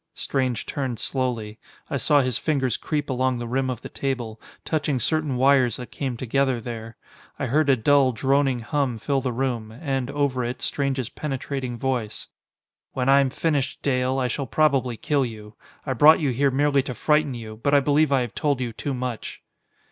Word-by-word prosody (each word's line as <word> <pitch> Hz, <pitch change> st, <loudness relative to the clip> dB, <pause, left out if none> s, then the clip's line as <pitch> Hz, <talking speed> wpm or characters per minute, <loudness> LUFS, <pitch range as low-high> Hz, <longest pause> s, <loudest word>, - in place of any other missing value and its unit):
Strange 130 Hz, -4 st, -1 dB
turned 130 Hz, -4 st, -3 dB
slowly. 120 Hz, -5 st, -2 dB, 0.3 s
I 140 Hz, -, -2 dB
saw 145 Hz, +3 st, +4 dB
his 130 Hz, -3 st, 0 dB
fingers 135 Hz, -5 st, 0 dB
creep 150 Hz, -2 st, -2 dB
along 130 Hz, -1 st, 0 dB
the 120 Hz, 0 st, -5 dB
rim 130 Hz, +2 st, 0 dB
of 125 Hz, -1 st, -4 dB
the -, -, -5 dB
table, 120 Hz, -5 st, -4 dB, 0.2 s
touching 145 Hz, -4 st, 0 dB
certain 155 Hz, 0 st, 0 dB
wires 130 Hz, -2 st, +4 dB
that 125 Hz, -, -8 dB
came 130 Hz, -4 st, -3 dB
together 130 Hz, +1 st, 0 dB
there. 115 Hz, -1 st, -7 dB, 0.4 s
I -, -, -2 dB
heard 145 Hz, +4 st, +2 dB
a 135 Hz, -, +6 dB
dull, 135 Hz, +2 st, +4 dB
droning 135 Hz, +1 st, +1 dB
hum 125 Hz, +2 st, -1 dB
fill 135 Hz, +4 st, 0 dB
the 125 Hz, -, -1 dB
room, 120 Hz, -3 st, -2 dB
and, 135 Hz, +1 st, -3 dB
over 140 Hz, -3 st, 0 dB
it, 120 Hz, +1 st, -4 dB
Strange's 135 Hz, -4 st, -1 dB
penetrating 135 Hz, -4 st, -4 dB
voice. 120 Hz, -4 st, -2 dB, 0.7 s
"When 130 Hz, 0 st, 0 dB
I 140 Hz, +1 st, +7 dB
am 135 Hz, -1 st, +2 dB
finished, 145 Hz, 0 st, -1 dB
Dale, 130 Hz, -1 st, +1 dB
I 130 Hz, -1 st, +1 dB
shall 135 Hz, +3 st, -3 dB
probably 130 Hz, -3 st, +2 dB
kill 145 Hz, +2 st, +1 dB
you. 110 Hz, -3 st, -7 dB, 0.3 s
I 135 Hz, -, -1 dB
brought 150 Hz, +6 st, +7 dB
you 145 Hz, -5 st, +1 dB
here 140 Hz, +3 st, +2 dB
merely 140 Hz, +1 st, +2 dB
to 130 Hz, -2 st, -6 dB
frighten 150 Hz, +1 st, +2 dB
you, 110 Hz, -2 st, -8 dB
but 140 Hz, +3 st, +3 dB
I -, -, +7 dB
believe 145 Hz, +1 st, +2 dB
I 135 Hz, -2 st, +3 dB
have 120 Hz, -3 st, -4 dB
told 145 Hz, -3 st, 0 dB
you 120 Hz, -3 st, -3 dB
too 135 Hz, +5 st, -3 dB
much." 125 Hz, -2 st, -5 dB
130 Hz, 190 wpm, -24 LUFS, 120-140 Hz, 0.7 s, I